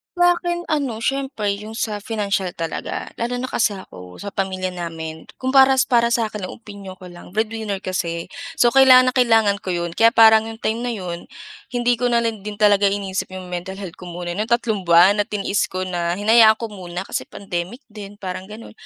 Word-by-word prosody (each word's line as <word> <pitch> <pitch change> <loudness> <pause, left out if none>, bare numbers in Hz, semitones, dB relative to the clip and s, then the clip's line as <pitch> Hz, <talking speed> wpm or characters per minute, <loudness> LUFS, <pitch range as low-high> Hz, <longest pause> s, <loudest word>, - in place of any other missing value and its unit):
Sa'kin 350 0 +2
ano, 265 -7 -1
siyempre 265 -8 -1
yung 215 +1 -9
sa 210 -2 -2
financial 205 -3 -2
talaga. 165 -1 -5
Lalo 240 +1 -1
na 255 +1 -4
kasi 215 -2 +1
ako 90 - -11
sa 200 - -7
pamilya 185 -2 -2
namin, 165 -2 -7
kung 260 0 -3
para 270 0 +6 0.2
para 235 -1 +4
sa 235 -2 0
akin, 200 -3 -5
opinyon 200 -4 -10
ko 180 -1 -12
lang 175 +2 -14
breadwinner 220 -2 -2
kasi. 170 -2 -3 0.2
So 240 - +4
kailangan 255 -1 +7
na - - -24
kailangan 225 -4 +3
ko 185 -3 -3
'yon, 170 -1 -3
kaya 230 +6 +3
parang 220 -1 +7
yung 225 - -7
time 225 0 -2
na 235 - -2
'yon 175 -4 -6 0.4
hindi 245 -1 0
ko 245 - +1
na 235 -1 +2
lang 225 -2 -2
din 210 - -5
talaga 205 -1 +4
iniisip 195 -1 -2
yung 185 -1 -8
mental 180 +2 -5
health 195 -4 -9
ko 180 - -9
muna 175 0 -5
ng 210 +5 -2
tatlong 220 -5 0
buwan 180 +5 +6
at 205 - +1
tiniis 205 0 -1
ko 185 0 -4
na 175 -2 -2
hinayaan 220 +2 +6
ko 225 0 -6
muna, 180 -2 -6
kasi - - -4
pandemic 190 +6 -6
din 205 -1 -9
parang 185 -1 -6
gano'n. 215 +2 -10
205 Hz, 200 wpm, -21 LUFS, 185-230 Hz, 0.4 s, kailangan